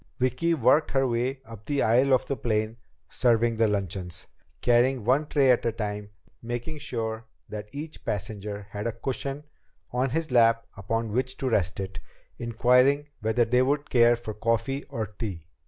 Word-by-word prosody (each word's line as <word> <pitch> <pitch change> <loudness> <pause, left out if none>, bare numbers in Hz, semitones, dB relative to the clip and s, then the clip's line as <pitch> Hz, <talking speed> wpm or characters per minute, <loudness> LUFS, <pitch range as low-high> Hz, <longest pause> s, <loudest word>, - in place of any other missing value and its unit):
Vicki 130 +7 +1
worked 140 +3 +4
her 135 -1 +3
way 125 +3 -1
up 110 -2 -12
the 145 -1 +1
aisle 125 +5 +4
of 130 - +4
the 140 - -2
plane 110 -2 -1 0.3
serving 120 -2 +2
the 115 0 +4
luncheons, 95 -3 -3 0.3
carrying 120 +1 +3
one 135 +7 +2
tray 140 -3 +4
at 125 - +2
a 115 - +1
time, 105 -2 -4 0.3
making 120 +6 -5
sure 115 -3 -3 0.2
that 105 0 -6
each 150 +3 -7
passenger 105 0 -4
had 105 +2 -3
a 115 - -2
cushion 135 +4 -3 0.5
on 125 +2 +1
his 160 +2 -2
lap 115 -1 +4
upon 115 +3 -2
which 130 +3 -1
to 135 - -2
rest 100 -6 +1
it, 95 -2 -5 0.4
inquiring 125 +5 +3
whether 110 +2 +2
he 125 +2 +3
would 145 +3 0
care 120 -1 +6
for 115 -2 -6
coffee 115 +5 -1
or 110 - -3
tea. 100 -5 -6
120 Hz, 170 wpm, -27 LUFS, 110-130 Hz, 0.5 s, care